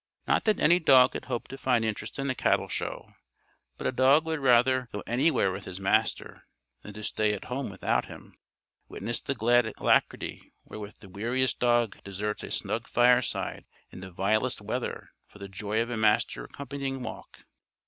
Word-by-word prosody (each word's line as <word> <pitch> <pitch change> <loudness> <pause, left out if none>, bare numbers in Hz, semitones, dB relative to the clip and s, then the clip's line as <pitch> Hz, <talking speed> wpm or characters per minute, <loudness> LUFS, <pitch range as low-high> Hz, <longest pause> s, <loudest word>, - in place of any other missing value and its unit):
Not - - +2
that 215 -1 +2
any 175 +3 +5
dog 130 -6 +6
could - - -6
hope 120 -2 -4
to 135 - -8
find 125 -4 +2
interest 105 0 -4
in 135 0 -2
a 130 - +1
cattle - - +1
show, - - -5 0.6
but - - -7
a - - +2
dog 135 +5 +4
would 160 -1 -2
rather 125 -1 +3
go 105 - -5
anywhere 125 - +2
with 95 +1 -7
his 90 - -7
Master 95 - 0 0.3
than 105 - -11
to 105 - -8
stay 105 0 0
at 100 - -5
home 130 0 -3
without 95 -1 -1
him. - - -12 0.5
Witness 120 +1 -4
the 140 - -3
glad 120 0 +3
alacrity - - 0
wherewith 105 -1 -9
the 100 - -13
weariest 120 +7 -1
dog 120 -3 +1
deserts 105 +2 -4
a - - -7
snug - - -2
fireside 125 +1 +2 0.3
in - - -10
the 95 0 -8
vilest 110 +7 0
weather 115 +4 -4 0.2
for - - -17
the 100 -1 -8
joy 105 +3 -3
of 120 - -7
a 120 - -2
master 105 - +1
accompanying 140 -2 -5
walk. 110 - -9
120 Hz, 180 wpm, -28 LUFS, 105-130 Hz, 0.6 s, dog